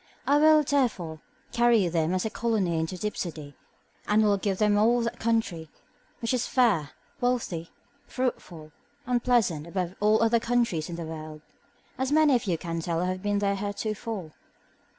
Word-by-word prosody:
I 285 Hz, +1 st, +4 dB
will, 310 Hz, 0 st, +6 dB
therefore, 225 Hz, -, -1 dB, 0.3 s
carry 235 Hz, -5 st, +3 dB
them 165 Hz, +1 st, 0 dB
as 185 Hz, -, -1 dB
a 220 Hz, -, -2 dB
colony 205 Hz, -8 st, 0 dB
into 160 Hz, +3 st, -3 dB
Dipsody, 165 Hz, -7 st, -5 dB, 0.5 s
and 215 Hz, +1 st, +3 dB
will 205 Hz, -1 st, +3 dB
give 195 Hz, -1 st, -1 dB
them 210 Hz, 0 st, +3 dB
all 230 Hz, +4 st, +3 dB
that 235 Hz, 0 st, -3 dB
country, 220 Hz, -9 st, -1 dB, 0.5 s
which 230 Hz, -, 0 dB
is 250 Hz, -1 st, 0 dB
fair, 200 Hz, -, +2 dB, 0.3 s
wealthy, 235 Hz, -10 st, -1 dB, 0.4 s
fruitful, 175 Hz, -11 st, -4 dB, 0.3 s
and 245 Hz, -1 st, 0 dB
pleasant, 190 Hz, -11 st, +1 dB
above 180 Hz, 0 st, -3 dB
all 215 Hz, +2 st, +3 dB
other 230 Hz, +1 st, +3 dB
countries 230 Hz, -10 st, 0 dB
in 170 Hz, -, -5 dB
the 170 Hz, -1 st, -5 dB
world, 155 Hz, -1 st, -8 dB, 0.6 s
as 260 Hz, +1 st, -1 dB
many 305 Hz, -1 st, +5 dB
of 240 Hz, -, -1 dB
you 175 Hz, -4 st, 0 dB
can 165 Hz, 0 st, -4 dB
tell 165 Hz, 0 st, -2 dB
who -, -, 0 dB
have 185 Hz, 0 st, -5 dB
been 205 Hz, 0 st, 0 dB
there 200 Hz, -1 st, +1 dB
heretofore. 205 Hz, -2 st, -4 dB
205 Hz, 170 wpm, -27 LUFS, 170-235 Hz, 0.6 s, will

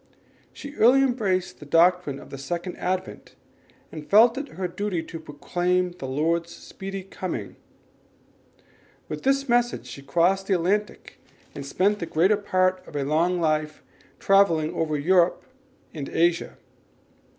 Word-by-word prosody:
She 285 Hz, 0 st, -10 dB
early 255 Hz, +4 st, +5 dB
embraced 205 Hz, -8 st, -1 dB
the 150 Hz, -, -11 dB
doctrine 170 Hz, -2 st, +3 dB
of -, -, -14 dB
the 135 Hz, -, -7 dB
Second 175 Hz, +6 st, -4 dB
Advent, 185 Hz, +1 st, -4 dB, 0.6 s
and 155 Hz, -1 st, -9 dB
felt 225 Hz, +4 st, +6 dB
it 280 Hz, +1 st, -4 dB
her 185 Hz, -1 st, -1 dB
duty 180 Hz, -1 st, -3 dB
to 165 Hz, 0 st, -8 dB
proclaim 180 Hz, +4 st, -1 dB
the 155 Hz, -6 st, -8 dB
Lord's 165 Hz, +5 st, 0 dB
speedy 195 Hz, 0 st, -8 dB
coming. 145 Hz, -, -6 dB, 1.5 s
With 150 Hz, 0 st, -6 dB
this 275 Hz, +1 st, +1 dB
message 240 Hz, 0 st, +1 dB
she 140 Hz, -, -9 dB
crossed 180 Hz, +6 st, +1 dB
the 195 Hz, -, +2 dB
Atlantic 200 Hz, +5 st, -2 dB, 0.3 s
and 140 Hz, -, -7 dB
spent 195 Hz, +9 st, 0 dB
the 170 Hz, -, -4 dB
greater 185 Hz, +7 st, +3 dB
part 185 Hz, -2 st, +1 dB
of -, -, -12 dB
a 145 Hz, -, -1 dB
long 165 Hz, +5 st, +1 dB
life 155 Hz, -2 st, -1 dB, 0.2 s
in -, -, -29 dB
travelling 170 Hz, -6 st, +3 dB
over 155 Hz, -2 st, -1 dB
Europe 175 Hz, +4 st, +2 dB, 0.5 s
and 145 Hz, -4 st, -6 dB
Asia. 170 Hz, +1 st, 0 dB
180 Hz, 145 wpm, -25 LUFS, 155-195 Hz, 1.5 s, felt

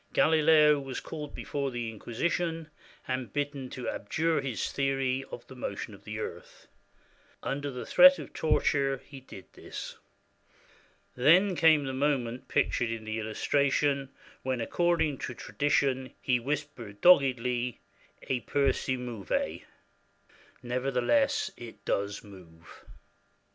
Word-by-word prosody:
Galileo 155 Hz, -2 st, +5 dB
was 135 Hz, -2 st, -5 dB
called 150 Hz, -3 st, -7 dB
before 140 Hz, -1 st, -3 dB
the 120 Hz, -2 st, -4 dB
Inquisition, 160 Hz, -, -2 dB, 0.4 s
and 130 Hz, -1 st, -3 dB
bidden 145 Hz, -2 st, -3 dB
to 125 Hz, -, -6 dB
abjure 160 Hz, +8 st, 0 dB
his 130 Hz, -6 st, -3 dB
theory 135 Hz, -1 st, 0 dB
of 120 Hz, -, -8 dB
the -, -, -12 dB
motion 110 Hz, -4 st, -5 dB
of 100 Hz, -, -15 dB
the 110 Hz, 0 st, -5 dB
earth. 110 Hz, -, -7 dB, 0.8 s
Un 140 Hz, +1 st, -2 dB
der 145 Hz, -, -3 dB
the 125 Hz, -2 st, -6 dB
threat 275 Hz, +1 st, +8 dB
of -, -, -9 dB
torture 140 Hz, -3 st, +1 dB
he 140 Hz, -2 st, -11 dB
did 115 Hz, -7 st, -12 dB
this. -, -, -8 dB, 1.2 s
Then 180 Hz, +9 st, +5 dB
came 160 Hz, -3 st, +5 dB
the 135 Hz, -1 st, -3 dB
moment 130 Hz, -3 st, -1 dB
pictured 120 Hz, -, +1 dB
in 115 Hz, -1 st, -5 dB
the 110 Hz, 0 st, -3 dB
illustration 140 Hz, +5 st, +1 dB, 0.3 s
when, 130 Hz, -1 st, -2 dB
according 160 Hz, +2 st, +1 dB
to 120 Hz, -, -5 dB
tradition, 135 Hz, -2 st, 0 dB
he 125 Hz, -2 st, +1 dB
whispered 130 Hz, -6 st, -5 dB
doggedly, 125 Hz, -, +3 dB, 0.5 s
"E 130 Hz, -, 0 dB
pur 140 Hz, +2 st, +1 dB
si 130 Hz, -1 st, -2 dB
muove" 120 Hz, -5 st, -3 dB, 1.0 s
(Nevertheless, 125 Hz, -, +1 dB
it 110 Hz, -4 st, -11 dB
does 100 Hz, 0 st, -1 dB
move). 90 Hz, -5 st, -15 dB
135 Hz, 125 wpm, -29 LUFS, 120-145 Hz, 1.2 s, threat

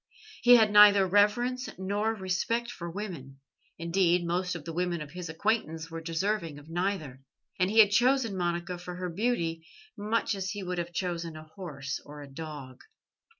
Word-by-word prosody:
He 245 Hz, 0 st, +8 dB
had 220 Hz, -3 st, +5 dB
neither 205 Hz, -1 st, +8 dB
reverence 225 Hz, +7 st, +2 dB
nor 205 Hz, +4 st, -1 dB
respect 220 Hz, +5 st, -1 dB
for 170 Hz, -7 st, -7 dB
women 165 Hz, -9 st, -7 dB, 0.4 s
indeed, 175 Hz, +1 st, +2 dB
most 180 Hz, +1 st, -1 dB
of 160 Hz, -4 st, -8 dB
the 165 Hz, -, -5 dB
women 175 Hz, 0 st, -1 dB
of 150 Hz, -1 st, -8 dB
his 180 Hz, 0 st, -7 dB
acquaintance 165 Hz, -3 st, -1 dB
were 165 Hz, 0 st, -5 dB
deserving 165 Hz, -1 st, -2 dB
of 145 Hz, +1 st, -13 dB
neither 170 Hz, -7 st, -2 dB, 0.4 s
and 185 Hz, 0 st, +3 dB
he 220 Hz, -, -2 dB
had 210 Hz, -2 st, +8 dB
chosen 245 Hz, -1 st, +3 dB
Monica 175 Hz, 0 st, -2 dB
for 180 Hz, 0 st, -7 dB
her 180 Hz, -1 st, -4 dB
beauty, 170 Hz, -5 st, -1 dB, 0.3 s
much 225 Hz, +2 st, 0 dB
as 190 Hz, -2 st, -3 dB
he 205 Hz, -1 st, -4 dB
would 180 Hz, -1 st, -3 dB
have 170 Hz, 0 st, -4 dB
chosen 170 Hz, -2 st, -3 dB
a 155 Hz, -, -9 dB
horse 140 Hz, -8 st, -5 dB
or 145 Hz, 0 st, -10 dB
a -, -, -10 dB
dog. 145 Hz, -4 st, -8 dB
180 Hz, 175 wpm, -29 LUFS, 165-205 Hz, 0.4 s, He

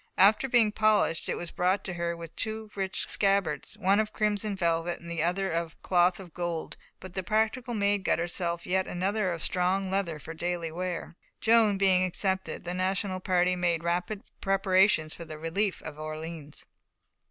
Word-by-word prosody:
After 215 Hz, +7 st, +5 dB
being 230 Hz, -4 st, +4 dB
polished, 215 Hz, -6 st, +2 dB
it -, -, 0 dB
was 175 Hz, -, -6 dB
brought 185 Hz, +3 st, +1 dB
to 190 Hz, -, -4 dB
her 170 Hz, -1 st, -2 dB
with 165 Hz, -1 st, -9 dB
two 220 Hz, -1 st, -4 dB
rich 190 Hz, -1 st, -3 dB
scabbards, 195 Hz, -4 st, +1 dB
one 200 Hz, 0 st, +3 dB
of 215 Hz, -1 st, 0 dB
crimson 210 Hz, -1 st, 0 dB
velvet, 170 Hz, -1 st, 0 dB
the 170 Hz, -1 st, -4 dB
other 190 Hz, +3 st, 0 dB
of 165 Hz, -1 st, -3 dB
cloth 180 Hz, 0 st, +3 dB
of 180 Hz, -4 st, -11 dB
gold; 175 Hz, -2 st, -3 dB, 0.2 s
but 185 Hz, -2 st, -10 dB
the 190 Hz, -, -2 dB
practical 220 Hz, +5 st, 0 dB
Maid 200 Hz, -1 st, +1 dB
got -, -, +2 dB
herself 170 Hz, 0 st, -2 dB
yet 190 Hz, +1 st, +1 dB
another 190 Hz, +2 st, 0 dB
of 170 Hz, -2 st, -3 dB
strong 185 Hz, +1 st, +1 dB
leather 190 Hz, -5 st, -1 dB
for 160 Hz, +2 st, -8 dB
daily 170 Hz, 0 st, -3 dB
wear. 175 Hz, 0 st, -4 dB, 0.2 s
Joan, 220 Hz, -3 st, +4 dB
being 190 Hz, -2 st, +4 dB
accepted, 190 Hz, +1 st, -1 dB
the 175 Hz, 0 st, -3 dB
National 185 Hz, +1 st, -1 dB
party 180 Hz, -1 st, +2 dB
made 170 Hz, -2 st, 0 dB
rapid 175 Hz, +4 st, -1 dB, 0.2 s
preparations 190 Hz, -4 st, +3 dB
for 170 Hz, -, -8 dB
the 155 Hz, -1 st, -8 dB
relief 180 Hz, +6 st, -1 dB
of 150 Hz, -1 st, -8 dB
Orleans. 155 Hz, -1 st, -7 dB
185 Hz, 175 wpm, -28 LUFS, 170-200 Hz, 0.2 s, After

